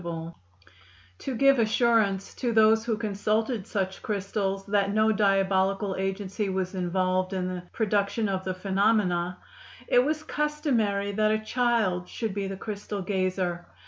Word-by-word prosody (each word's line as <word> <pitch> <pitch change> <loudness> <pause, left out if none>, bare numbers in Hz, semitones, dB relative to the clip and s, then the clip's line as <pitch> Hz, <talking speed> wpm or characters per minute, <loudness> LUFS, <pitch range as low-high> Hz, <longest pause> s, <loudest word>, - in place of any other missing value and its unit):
] 95 0 -27
To 265 - -4
give 275 +1 +4
assurance 220 -3 +2
to 245 -2 -2
those 220 0 +5
who 225 -2 0
consulted 215 +1 -1
such 190 -2 -2
crystals 195 -1 -2
that 200 -1 +1
no 215 +1 +3
diabolical 195 -1 +2
agency 195 +1 -2
was 190 0 -2
involved 185 +1 0
in 185 -1 -1
the 180 -1 -4
production 205 0 0
of 190 -1 -2
the 185 -1 -3
phenomena, 190 -2 +1 0.5
it 245 - +5
was 310 +2 -1
customary 265 -11 0
that 215 +1 +2
a 215 - +2
child 220 -7 +1
should 225 -4 -3
be 200 -1 -2
the 195 0 -5
crystal 205 -1 -5
gazer. 185 -2 -1
200 Hz, 145 wpm, -27 LUFS, 190-220 Hz, 0.5 s, those